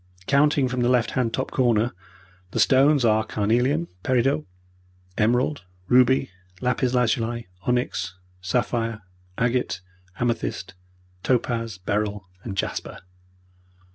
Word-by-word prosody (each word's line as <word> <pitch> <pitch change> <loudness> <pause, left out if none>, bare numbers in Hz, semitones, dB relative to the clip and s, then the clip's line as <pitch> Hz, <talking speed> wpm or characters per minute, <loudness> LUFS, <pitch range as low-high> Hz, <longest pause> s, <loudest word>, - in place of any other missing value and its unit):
Counting 140 0 +3
from 125 0 -3
the 120 - +2
left 125 -2 +2
hand 125 -3 0
top 130 +3 -3
corner, 120 -2 +2 0.6
the - - -3
stones 135 0 +5
are 110 -1 +3
carnelian, 125 +10 +1
peridot, 130 +6 +1 0.7
emerald, 125 +6 +1 0.3
ruby, 130 -1 +4 0.3
lapis 125 +1 0
lazuli, 120 -1 0 0.2
onyx, 110 -7 -1 0.3
sapphire, 115 +2 -1 0.4
agate, 120 -4 0 0.4
amethyst, 115 -5 -2 0.5
topaz, 115 -4 0
beryl, 100 +1 -2 0.2
and 100 -4 -6
jasper." - - -3
120 Hz, 105 wpm, -24 LUFS, 110-130 Hz, 0.7 s, stones